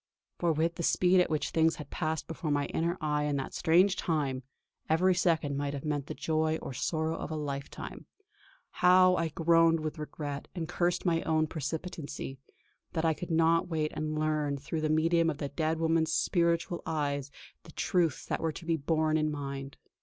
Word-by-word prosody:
For 170 -1 +2
with 165 +2 0
the - - -3
speed 180 +2 +4
at 180 - +3
which 155 -1 -1
things 160 -1 +3
had 150 - -10
passed 160 0 -2
before 165 0 -4
my 145 -1 +1
inner 170 +2 0
eye 150 -1 0
in 145 -1 0
that 135 -1 -3
strange 180 +4 +4
time, 140 -6 -1 0.5
every 180 +4 +4
second 165 -5 +1
might 145 0 -2
have 140 - -6
meant 145 -2 -2
the - - -5
joy 160 0 0
or - - -6
sorrow 160 +5 -1
of - - -5
a 160 - -3
lifetime. 140 -2 -6 0.6
How 185 0 +5
I 165 -1 0
groaned 165 +1 +3
with 155 0 -4
regret, 145 -1 -5
and 165 -3 -3
cursed 175 +2 0
my 165 -2 +2
own 155 -1 +1
precipitancy, 155 -2 -5 0.5
that 160 -1 0
I 160 - +3
could 175 - -7
not 165 0 +3
wait 155 -3 -1
and 155 0 -3
learn 155 -2 0
through 155 +3 -4
the 155 - 0
medium 165 +2 +3
of 150 - -3
the 140 -1 -4
dead 160 +2 -1
woman's 160 0 +2
spiritual 170 0 +1
eyes 145 -3 -1 0.3
the 160 - -14
truths 170 -2 0
that - - -2
were 165 -1 0
to 170 - -9
be 165 -1 +1
borne 155 +1 +1
in 155 0 +1
mind! 140 -2 -5
160 Hz, 190 wpm, -30 LUFS, 150-165 Hz, 0.6 s, How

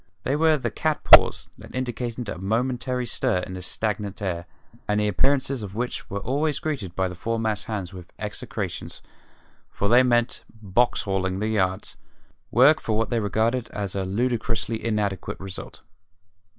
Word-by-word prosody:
They 135 - 0
were 155 0 +4
the 135 - -3
"cats 155 -1 -1
paws" - - +7
that - - -11
indicated 120 -2 -3
a 90 - -5
momentary 125 +5 -1
stir 120 -4 +1
in 95 - -8
the 90 - -6
stagnant 105 +2 -2
air, 90 -4 -3 0.4
and 105 0 +1
the 105 - +2
appearances 130 +5 +1
of 100 -1 -7
which 120 +2 -3
were 100 +1 -3
always 145 +7 0
greeted 120 - -4
by 95 0 +1
the 90 - -6
foremast 110 +2 -1
hands 100 -6 -4
with 90 -2 -11
execrations, - - -5 0.7
for 100 - -1
they 120 +2 +7
meant 120 -1 +1 0.2
"box 110 +4 +1
hauling" 95 -2 -1
the 105 +2 -1
yards 95 -3 -1 0.5
work - - +5
for 110 - -1
what 115 +2 0
they 120 - +2
regarded 115 +3 0
as 100 -2 -3
a 95 - -1
ludicrously 115 +2 -1
inadequate 105 -4 -1
result. 95 -1 -8
110 Hz, 165 wpm, -25 LUFS, 95-125 Hz, 0.7 s, paws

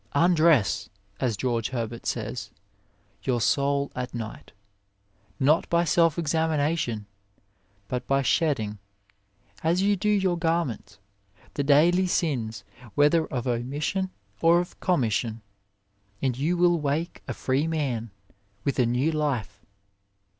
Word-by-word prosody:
"Undress," 155 - +3 0.3
as 120 -6 0
George 115 -2 -1
Herbert 115 -2 -4
says, - - -3 0.7
"your 125 -3 0
soul 140 +4 +1
at 125 0 -4
night," 115 -2 -7 0.9
not 150 +4 +3
by 170 0 +3
self 165 -1 +3
examination, 155 -7 0 0.8
but 125 +1 -4
by 135 0 +2
shedding, 120 -10 +1 0.8
as 170 +4 +2
you 205 0 +3
do 205 +2 -1
your 190 -4 +2
garments, 165 -10 -1 0.6
the 145 - -1
daily 170 +6 +4
sins 130 - -1 0.3
whether 150 +3 +4
of 125 -1 -3
omission 140 +10 -1 0.3
or 170 +1 +5
of 175 - -5
commission, 115 - 0 0.8
and 130 -3 0
you 155 +7 0
will 175 -1 +4
wake 150 +4 -2
a - - -2
free 135 +4 0
man, 135 -8 -2 0.5
with 140 - -1
a 125 - +4
new 125 +7 +1
life. 125 -10 -2
145 Hz, 120 wpm, -26 LUFS, 120-165 Hz, 0.9 s, or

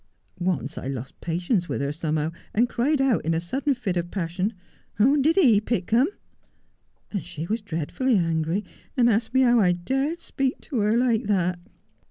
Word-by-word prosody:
Once 175 -6 -2
I - - -6
lost 130 -1 -6
patience 175 +2 -1
with - - -2
her 140 0 -1
somehow, 155 0 -1 0.2
and 235 +4 +4
cried 270 +5 +1
out 270 -4 +2
in 165 +1 0
a - - +1
sudden 265 - -1
fit 210 -7 -2
of 175 0 -2
passion, 185 +3 -2 0.3
" - - -40
Did 280 +8 +4
he 245 - +5
pick 215 -4 -2
them 245 +6 +5
1 - - -5 0.5
" - - -43
and 200 - -3
she 155 +2 -6
was 220 +5 -2
dreadfully 205 - 0
angry, 165 +2 0 0.3
and 240 -2 +5
asked 225 0 +1
me 260 - +6
how 240 -2 +5
I 180 -4 +4
dared 270 - -1
speak 270 -5 -2
to 260 - -3
her 210 +2 +2
like 240 -3 +2
that.' 180 -3 +1
205 Hz, 195 wpm, -25 LUFS, 170-250 Hz, 0.5 s, me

